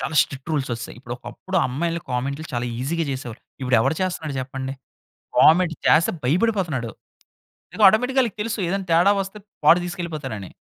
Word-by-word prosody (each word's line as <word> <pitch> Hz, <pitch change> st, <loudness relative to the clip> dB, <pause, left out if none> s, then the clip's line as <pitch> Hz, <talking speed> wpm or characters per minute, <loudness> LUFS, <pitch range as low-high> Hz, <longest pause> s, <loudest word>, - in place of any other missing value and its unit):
చాలా 155 Hz, -, -3 dB
strict 135 Hz, +2 st, -8 dB
rules 145 Hz, -3 st, -1 dB
ఓచ్చేశాయి. 115 Hz, 0 st, -6 dB
ఇప్పుడు 120 Hz, -1 st, -6 dB
ఒకప్పుడు 120 Hz, +11 st, -6 dB
అమ్మాయిల్ని 165 Hz, +6 st, -2 dB
కామెంట్‌లు 140 Hz, +5 st, -2 dB
చాలా 120 Hz, 0 st, -1 dB
ఈజీగా 165 Hz, +6 st, -1 dB
చేసేవారు. 130 Hz, -3 st, -6 dB, 0.2 s
ఇప్పుడు 125 Hz, -1 st, +3 dB
ఎవడు 155 Hz, -, +1 dB
చేస్తున్నాడు 160 Hz, -5 st, -3 dB
చెప్పండి? 130 Hz, +1 st, -5 dB, 0.6 s
కామెంట్ 165 Hz, +1 st, +6 dB
చేస్తే 165 Hz, +1 st, +5 dB
భయపడిపోతున్నాడు. 160 Hz, -, 0 dB, 0.8 s
ఏదో 215 Hz, -, +1 dB
ఆటోమేటిక్‌గా 250 Hz, +7 st, +3 dB
వాళ్ళకి 230 Hz, -6 st, -2 dB
తెలుసు. 230 Hz, +1 st, -2 dB
ఏదైనా 195 Hz, +1 st, -2 dB
తేడా 175 Hz, +4 st, +5 dB
వస్తే 195 Hz, +2 st, -7 dB, 0.3 s
వాడు 170 Hz, +4 st, +7 dB
తీసుకెళ్ళిపోతాడు 160 Hz, -8 st, -5 dB
అని. 95 Hz, -, -9 dB
155 Hz, 160 wpm, -23 LUFS, 130-185 Hz, 0.8 s, వాడు